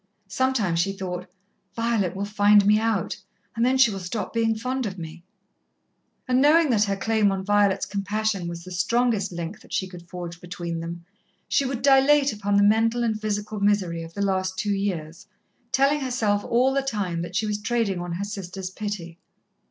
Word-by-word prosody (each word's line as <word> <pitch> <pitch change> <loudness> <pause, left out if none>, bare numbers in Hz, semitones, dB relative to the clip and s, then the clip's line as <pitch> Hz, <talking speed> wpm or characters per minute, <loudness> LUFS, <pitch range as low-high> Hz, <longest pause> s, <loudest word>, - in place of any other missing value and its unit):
Sometimes 210 -5 0
she 195 +3 +1
thought, 180 -2 -5 0.5
"Violet 230 -6 0
will 200 +1 -2
find 205 0 +4
me 210 +1 +5
out, 220 -5 -1 0.4
and 230 - 0
then 255 +2 +3
she 260 -4 +5
will 195 - -4
stop 185 +4 -4
being 225 -1 +1
fond 255 +2 -2
of 190 -1 -6
me." 165 0 -8 1.0
And, 255 0 +3
knowing 305 +1 +5
that 215 -2 +3
her 200 -1 -1
claim 215 0 +2
on 190 -1 -3
Violet's 205 -1 +2
compassion 200 -1 -2
was 170 0 -6
the 185 - -10
strongest 220 +2 +1
link 170 +3 -5
that - - -18
she 190 - -1
could 175 -2 -12
forge 175 -1 -7
between 175 -1 -5
them, 170 +1 -7 0.4
she 280 - +2
would 255 -2 -3
dilate 275 0 +5
upon 205 -1 0
the 200 - +5
mental 225 +3 +3
and 220 -2 -1
physical 210 0 -3
misery 200 -5 +1
of 165 0 -10
the 200 - -1
last 185 -1 -1
two 205 0 0
years, 175 -5 -3 0.4
telling 275 +2 +3
herself 225 -6 0
all 255 +3 +2
the 275 - +2
time 200 -10 -2
that 175 +1 -6
she 220 - +1
was 210 0 -2
trading 225 -4 0
on 175 -1 -4
her 190 +4 -3
sister's 190 -2 -6
pity. 190 -5 -6
205 Hz, 190 wpm, -24 LUFS, 180-230 Hz, 1.0 s, me